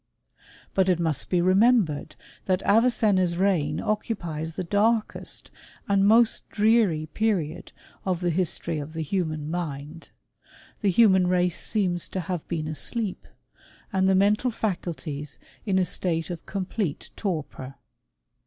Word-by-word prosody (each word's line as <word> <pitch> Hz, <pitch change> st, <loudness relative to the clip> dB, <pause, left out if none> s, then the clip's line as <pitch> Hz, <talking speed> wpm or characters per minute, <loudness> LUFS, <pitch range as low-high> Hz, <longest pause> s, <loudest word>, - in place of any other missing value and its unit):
But 190 Hz, -1 st, +2 dB
it 180 Hz, -2 st, +2 dB
must 160 Hz, -4 st, -1 dB
be 180 Hz, -2 st, +2 dB
remembered, 190 Hz, -, +3 dB, 0.3 s
that 185 Hz, 0 st, +1 dB
Avicenna's 205 Hz, -6 st, +3 dB
reign 175 Hz, -6 st, +1 dB
occupies 165 Hz, -7 st, -3 dB
the -, -, -3 dB
darkest 215 Hz, +5 st, 0 dB, 0.4 s
and 200 Hz, 0 st, +3 dB
most 225 Hz, +1 st, +4 dB
dreary 210 Hz, -7 st, +3 dB
period 185 Hz, -8 st, -1 dB, 0.3 s
of 185 Hz, -3 st, -1 dB
the 175 Hz, -1 st, 0 dB
history 170 Hz, -2 st, 0 dB
of 150 Hz, +2 st, -7 dB
the 160 Hz, -1 st, -3 dB
human 155 Hz, -3 st, -2 dB
mind. 160 Hz, -2 st, -5 dB, 0.7 s
The 205 Hz, -, +2 dB
human 190 Hz, -2 st, +5 dB
race 180 Hz, -1 st, +1 dB
seems 180 Hz, -5 st, 0 dB
to 185 Hz, -, -3 dB
have 175 Hz, -1 st, -4 dB
been 160 Hz, -3 st, -3 dB
asleep, 190 Hz, -, -3 dB, 0.7 s
and 190 Hz, 0 st, +3 dB
the 190 Hz, -, +4 dB
mental 205 Hz, +6 st, +3 dB
faculties 170 Hz, -, -4 dB, 0.3 s
in 190 Hz, -2 st, +2 dB
a 185 Hz, -, +3 dB
state 170 Hz, -1 st, -2 dB
of 170 Hz, -, -8 dB
complete 190 Hz, -4 st, -3 dB
torpor. 150 Hz, -8 st, -4 dB
180 Hz, 130 wpm, -25 LUFS, 160-205 Hz, 0.7 s, human